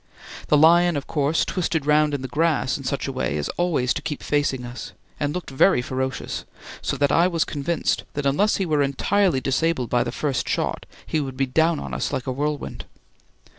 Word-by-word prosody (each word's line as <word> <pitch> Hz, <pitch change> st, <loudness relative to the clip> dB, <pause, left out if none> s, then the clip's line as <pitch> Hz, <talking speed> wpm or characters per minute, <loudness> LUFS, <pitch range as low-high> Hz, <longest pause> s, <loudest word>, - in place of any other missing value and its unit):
The 150 Hz, -, +4 dB
lion 170 Hz, +2 st, +5 dB
of 140 Hz, -, -4 dB
course 150 Hz, +1 st, +1 dB
twisted 165 Hz, -5 st, -1 dB
round 150 Hz, 0 st, +3 dB
in 135 Hz, -, -5 dB
the -, -, -3 dB
grass 150 Hz, 0 st, +1 dB
in 140 Hz, -, -6 dB
such 140 Hz, +2 st, -2 dB
a -, -, -2 dB
way 130 Hz, -, -2 dB
as 75 Hz, -, -2 dB
always 155 Hz, -8 st, 0 dB
to -, -, -4 dB
keep 150 Hz, -1 st, -5 dB
facing 145 Hz, -4 st, 0 dB
us, 120 Hz, +1 st, -8 dB, 0.3 s
and 145 Hz, 0 st, 0 dB
looked 180 Hz, -2 st, -5 dB
very 135 Hz, +4 st, +4 dB
ferocious, 130 Hz, +1 st, -3 dB, 0.4 s
so -, -, -2 dB
that 140 Hz, +1 st, +2 dB
I 170 Hz, +3 st, +4 dB
was 170 Hz, -3 st, +1 dB
convinced 150 Hz, +3 st, -1 dB
that 145 Hz, -1 st, -2 dB
unless 170 Hz, +10 st, +3 dB
he 195 Hz, -, -1 dB
were 155 Hz, -3 st, +1 dB
entirely 145 Hz, +3 st, +1 dB
disabled 135 Hz, -1 st, 0 dB
by 120 Hz, -1 st, +3 dB
the -, -, -4 dB
first 140 Hz, -4 st, -2 dB
shot -, -, -2 dB, 0.2 s
he 160 Hz, -, -1 dB
would 135 Hz, -2 st, -5 dB
be 135 Hz, -, +2 dB
down 160 Hz, +5 st, +2 dB
on 70 Hz, -2 st, -6 dB
us 60 Hz, -, -2 dB
like 125 Hz, -, -3 dB
a 130 Hz, -, -2 dB
whirlwind. 145 Hz, +3 st, -3 dB
145 Hz, 210 wpm, -23 LUFS, 130-165 Hz, 0.4 s, lion